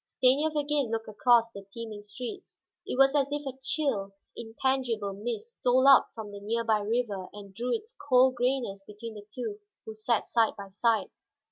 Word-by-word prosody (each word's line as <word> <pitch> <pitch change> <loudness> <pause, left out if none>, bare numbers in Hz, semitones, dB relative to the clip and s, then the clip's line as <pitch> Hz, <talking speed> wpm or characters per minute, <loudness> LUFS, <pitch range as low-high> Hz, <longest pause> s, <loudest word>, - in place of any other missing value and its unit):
Stanief 290 +5 +2
again 295 -3 +1
looked 225 0 -3
across 230 +2 +3
the 200 -2 -9
teeming 220 -1 -7
streets; 250 - -8 0.3
it - - -3
was 270 0 +6
as 280 -1 +1
if 290 0 -3
a 265 -1 -6
chill, 265 -9 -1 0.2
intangible 230 -3 -1
mist 240 - -5
stole 255 +2 +4
up 275 -1 +7
from 220 -2 -7
the 200 - -8
near 225 +3 -1
by 220 -2 +2
river 205 -3 -2
and 200 -1 -11
drew 240 +5 -3
its 450 +2 -3
cold 255 0 +6
grayness 245 -5 -1
between 210 +3 -9
the 205 -1 -11
two 220 -3 -5 0.3
who 220 - -6
sat 215 +1 0
side 230 -2 +2
by 200 -1 -8
side. 215 0 +1
230 Hz, 180 wpm, -29 LUFS, 210-265 Hz, 0.3 s, up